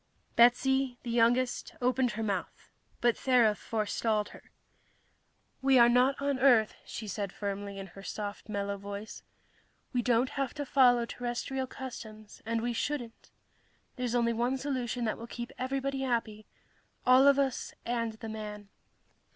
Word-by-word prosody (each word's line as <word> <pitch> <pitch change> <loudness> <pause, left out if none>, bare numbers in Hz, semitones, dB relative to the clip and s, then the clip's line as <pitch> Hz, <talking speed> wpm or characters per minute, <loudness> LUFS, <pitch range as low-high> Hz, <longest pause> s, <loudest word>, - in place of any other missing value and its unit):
Betsy, 250 +2 +4
the 235 - -4
youngest, 240 +2 +2
opened 250 -1 +1
her 225 +1 -3
mouth, 200 -4 -4 0.3
but 240 -1 +4
Thera 240 -5 +3
forestalled 215 0 -1
her. - - -15 1.1
"We 270 0 +5
are 235 -1 +7
not 250 +3 +3
on 280 -1 0
Earth," 240 -5 +5
she 220 - -6
said 200 -1 -3
firmly, 200 0 -4
in 195 - -6
her 195 +1 -12
soft, 205 +1 -6
mellow 200 -1 -2
voice. 200 +2 -7 0.7
"We 245 - +2
don't 240 +1 +2
have 275 -2 -2
to 290 -1 -3
follow 245 -3 +4
terrestrial 250 +2 -3
customs, 220 -5 -9
and 230 0 0
we 240 0 -1
shouldn't. 240 -2 -4 0.7
There's 245 -1 -2
only 235 -1 +2
one 240 +3 0
solution 255 -3 -2
that 215 - -2
will 230 - -7
keep 240 0 -6
everybody 270 +1 -2
happy 230 -4 -2 0.6
all 255 +2 +7
of 280 -1 +6
us 270 -2 -1
and 230 -2 -1
the 220 0 -8
man." 210 -2 -7
240 Hz, 150 wpm, -30 LUFS, 215-255 Hz, 1.1 s, are